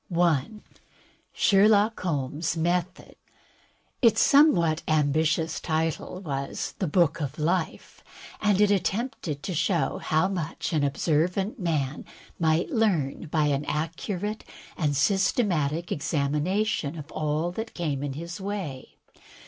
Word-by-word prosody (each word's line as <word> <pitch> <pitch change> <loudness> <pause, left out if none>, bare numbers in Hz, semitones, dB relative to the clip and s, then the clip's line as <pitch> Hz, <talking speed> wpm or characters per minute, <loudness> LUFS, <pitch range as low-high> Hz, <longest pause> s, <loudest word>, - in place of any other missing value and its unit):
J. 170 -5 +2 0.8
Sherlock 210 +2 +4
Holmes^ 155 0 -2
Method 175 +2 -2 0.8
Its 225 -3 +5
somewhat 175 - +5
ambitious 155 +2 +1
title 160 +3 -2
was 140 -6 -4
"The 185 - 0
Book 170 0 +2
of 145 0 -4
Life," 165 +2 -2 0.4
and 205 -2 +2
it 210 -1 +4
attempted 195 - -2
to 185 - -3
show 170 -2 0
how 160 +4 +1
much 175 -2 -4
an 150 -2 +2
observant 175 - 0
man 150 -6 -1 0.4
might 160 +1 +1
learn 175 - 0
by 155 0 +1
an 140 0 0
accurate 180 +7 -3 0.3
and 150 -5 0
systematic 175 - +1
examination 150 +3 -1
of 150 0 -9
all 155 +3 -1
that 225 +5 -6
came 150 -6 -2
in 145 -1 -3
his 170 +6 -7
way. 190 -10 -5
165 Hz, 115 wpm, -26 LUFS, 150-190 Hz, 0.8 s, Its